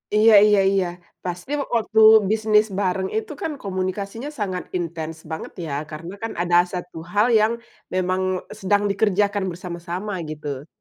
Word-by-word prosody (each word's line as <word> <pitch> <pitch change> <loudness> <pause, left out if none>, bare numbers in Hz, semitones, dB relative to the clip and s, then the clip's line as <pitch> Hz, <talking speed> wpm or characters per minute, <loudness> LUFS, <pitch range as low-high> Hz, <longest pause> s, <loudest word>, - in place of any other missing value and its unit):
Iya 215 +1 +6
iya 210 -1 +5
iya. 195 -2 +2 0.4
Pasti 180 +7 -5 0.2
waktu 220 -1 +1 0.3
bisnis 215 -1 +3
bareng 190 -1 0
itu, 220 - -3
kan, 325 - -2
komunikasinya 195 +6 -3
sangat 185 -3 -2
intens 165 -2 -4 0.2
banget, 160 - -5
ya, 150 - -5 0.2
karena, 165 +4 -7
kan, 225 - -2
ada 175 0 +1 0.2
1 180 -2 -6 0.2
hal 210 +1 +4
yang 215 +2 +3 0.4
memang 185 0 0 0.4
sedang 205 +2 +2
dikerjakan 205 0 +1
bersama-sama, 175 +3 -5 0.2
gitu. 145 -2 -6
190 Hz, 140 wpm, -22 LUFS, 175-210 Hz, 0.4 s, Iya